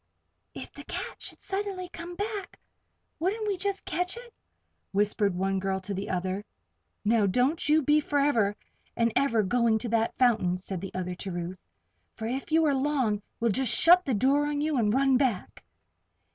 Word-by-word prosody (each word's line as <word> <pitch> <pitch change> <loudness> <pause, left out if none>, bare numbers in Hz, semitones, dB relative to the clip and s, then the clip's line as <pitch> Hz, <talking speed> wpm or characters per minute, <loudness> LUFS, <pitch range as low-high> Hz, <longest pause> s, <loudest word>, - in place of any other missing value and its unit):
"If - - -8
the - - -10
cat - - -6
should - - -4
suddenly 390 -2 -3
come 350 0 -8
back, 410 0 -4 0.6
wouldn't 420 +6 -1
we 405 - +1
just 395 +1 -3
catch 360 +4 -2
it?" 480 -1 -11 0.6
whispered 205 -1 +2
one 195 +1 0
girl 190 0 -1
to 200 +2 -4
the 195 +1 -4
other. 185 +2 -2 0.6
"Now, 215 -1 +3
don't 255 - +1
you 310 0 +4
be 295 +3 +4
forever 280 -9 +1 0.4
and 230 -1 +2
ever 235 -6 +3
going 230 +2 +2
to 235 +2 -4
that 225 0 0
fountain," 215 -8 +3
said 185 -1 -6
the 195 - -7
other 180 -1 -3
to 190 +2 -6
Ruth. 175 +1 -5 0.6
"For 220 - -6
if 265 +7 -4
you 320 0 +4
are 290 - +3
long, 265 -7 0 0.2
we'll 230 -1 +2
just 255 +3 +2
shut 355 +2 +7
the 265 -8 0
door 275 +7 +2
on 295 -1 -1
you 305 0 0
and 210 -3 +2
run 265 +2 +3
back." 250 -8 -1
245 Hz, 180 wpm, -28 LUFS, 200-310 Hz, 0.6 s, shut